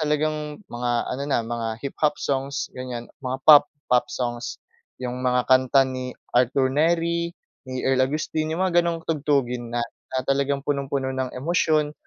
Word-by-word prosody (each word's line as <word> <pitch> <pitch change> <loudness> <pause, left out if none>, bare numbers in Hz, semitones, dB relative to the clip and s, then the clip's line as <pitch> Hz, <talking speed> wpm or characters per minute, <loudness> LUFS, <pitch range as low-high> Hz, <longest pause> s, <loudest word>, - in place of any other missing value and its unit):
talagang 150 0 -1 0.2
mga 120 0 -1 0.2
ano 140 - -3
na 135 - +2
mga 115 -1 -3 0.2
hip-hop 150 +2 0
songs 140 +1 -2
ganiyan 125 -2 -6 0.2
mga 130 0 -2
pop 145 -1 +9 0.2
pop 125 - +4
songs. 120 -1 -3 0.4
'Yong 125 0 -4
mga 125 -1 +2
kanta 130 +1 +5
ni 130 -1 -5 0.2
Arthur 130 +2 +3
Nery, 170 +2 +2 0.4
ni 130 0 -4
Earl 130 -1 +3
Augustin, 155 +1 -2
yung 185 - +1
mga 175 -2 +4
ganong 165 -1 -2
tugtugin 135 -6 0
na, 120 0 -1 0.2
na 130 0 -2
talagang 140 0 0
punong-puno 140 -2 -1
ng 130 -1 -3
emosyon, 155 0 +1
135 Hz, 155 wpm, -24 LUFS, 125-150 Hz, 0.4 s, pop